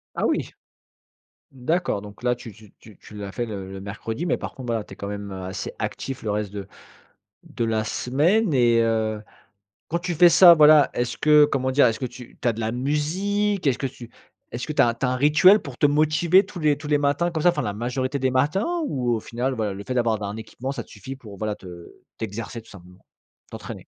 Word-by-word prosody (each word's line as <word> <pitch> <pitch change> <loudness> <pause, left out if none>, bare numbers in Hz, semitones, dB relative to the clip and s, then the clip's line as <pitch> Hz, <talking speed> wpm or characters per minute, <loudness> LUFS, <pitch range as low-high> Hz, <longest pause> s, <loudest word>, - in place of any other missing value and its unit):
Ah - - 0
oui! - - 0 1.0
D'accord, 135 - -1
donc 105 +2 -12
là, 125 0 +1
tu 120 -2 -10
tu 110 -2 -17
tu 110 -2 -16
tu 105 - -14
l'as 100 -1 -6
fait 120 +4 -3
le 95 -3 -6
le 95 - -8
mercredi, 110 - -5
mais - - +1
par - - -7
contre, 130 -3 -9
voilà, 115 -2 -1
tu - - -13
es - - -11
quand 100 - -6
même, 100 0 -6
heu, 95 -1 -6
assez 95 - -5
actif 135 -1 -4
le 110 - -4
reste 105 -1 -2
de 100 -1 -6 0.8
de 120 - -4
la 110 -1 0
semaine, 165 - +1
et, 120 -3 +4
heu. 110 -1 0 0.7
Quand 170 - -1
tu 175 0 -3
fais 175 +3 +7
ça, 170 +1 +9
voilà, 150 -2 +6
est-ce 120 0 -2
que, 150 -1 +6
comment 130 -2 -1
dire? 130 -1 +5
Est-ce 115 - -1
que 130 - -2
tu 125 0 -11
tu - - -2
as 120 - +3
de 110 - -8
la 110 0 -1
musique? 180 - -1
Est-ce 135 -4 +2
que 135 - -1
tu 120 -2 -12 0.4
est-ce 125 +6 -4
tu 150 - -6
as 120 -4 +5
tu 120 +4 -3
as - - +1
un 130 - 0
rituel 150 +9 +6
pour 140 -6 -10
te 145 - +5
motiver 155 +6 +3
tous 190 -3 -9
les 150 -2 +2
tous 150 0 -9
les 145 -1 +2
matins 145 +5 +1
comme 160 - -2
ça, 175 - +5
enfin 150 -4 -1
la 105 -3 -2
majorité 130 +5 -2
des 130 0 +1
matins? 195 - 0
Ou, 125 -4 0
au - - -2
final, 120 +4 -3
voilà, 105 -4 -2
le 100 - -8
fait 130 +4 -4
d'avoir 115 -3 +1
un 100 +1 -4
équipement, 120 +4 -6
ça 130 -4 -5
te - - -25
suffit 110 +6 -9
pour, 105 -7 -12
voilà, 105 0 -2
te 90 -3 -12 0.3
t'exercer 115 +2 -5
tout - - -20
simplement? 90 -1 -15 0.5
T'entraîner. - - -9
125 Hz, 235 wpm, -23 LUFS, 110-150 Hz, 1.0 s, ça